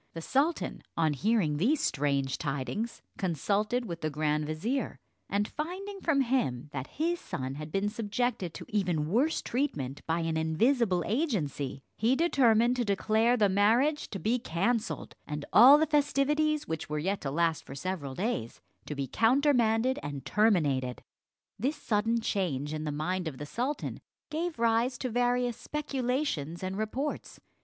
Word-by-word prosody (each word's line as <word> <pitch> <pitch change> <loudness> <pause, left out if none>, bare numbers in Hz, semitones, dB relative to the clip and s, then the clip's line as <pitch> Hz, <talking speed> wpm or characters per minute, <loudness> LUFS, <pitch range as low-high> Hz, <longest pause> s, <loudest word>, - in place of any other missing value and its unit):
The 165 - -4
sultan, 295 - 0 0.2
on 160 -2 +2
hearing 180 - +1
these 260 - +2
strange 140 -1 0
tidings, 150 - -3 0.2
consulted 205 - 0
with 170 -5 -6
the 155 - 0
grand 150 0 0
vizier; 220 - -2 0.3
and 205 +1 +1
finding 380 +6 -5
from 290 -4 +2
him 230 - 0
that 135 -1 -4
his 340 +3 0
son 130 -1 -4
had 150 +2 -7
been 195 +3 0
subjected 210 -3 -2
to - - -7
even 175 -7 0
worse 260 - +1
treatment 150 - -2
by 165 +1 +1
an 165 -1 -1
invisible 180 - +2
agency, 155 - -1 0.2
he 230 +5 +3
determined 250 -7 +3
to 245 - +1
declare 220 +3 +2
the 210 -3 +4
marriage 230 +10 +2
to 195 - -5
be 230 +5 0
cancelled, 220 +5 -1
and 150 -1 -4
all 260 +6 +10
the 315 - +3
festivities, 295 +1 +1
which 160 -2 -4
were 150 - -2
yet 190 +6 -1
to 140 - -2
last 165 +2 +1
for 135 - -9
several 145 -3 -4
days, 180 - -2 0.3
to 150 - -4
be 140 -1 -2
countermanded 245 - +3
and 140 -2 -6
terminated. 145 - +2 0.6
This 270 +8 0
sudden 225 0 0
change 155 -10 -1
in 155 0 -3
the 150 - -1
mind 175 +4 -2
of 140 -5 -5
the 150 - -6
sultan 250 - -3 0.3
gave 330 +2 -2
rise 235 +2 +2
to 255 - -3
various 245 0 +1
speculations 255 - -2
and 185 +1 -3
reports. 230 +8 -3
210 Hz, 155 wpm, -30 LUFS, 155-250 Hz, 0.6 s, all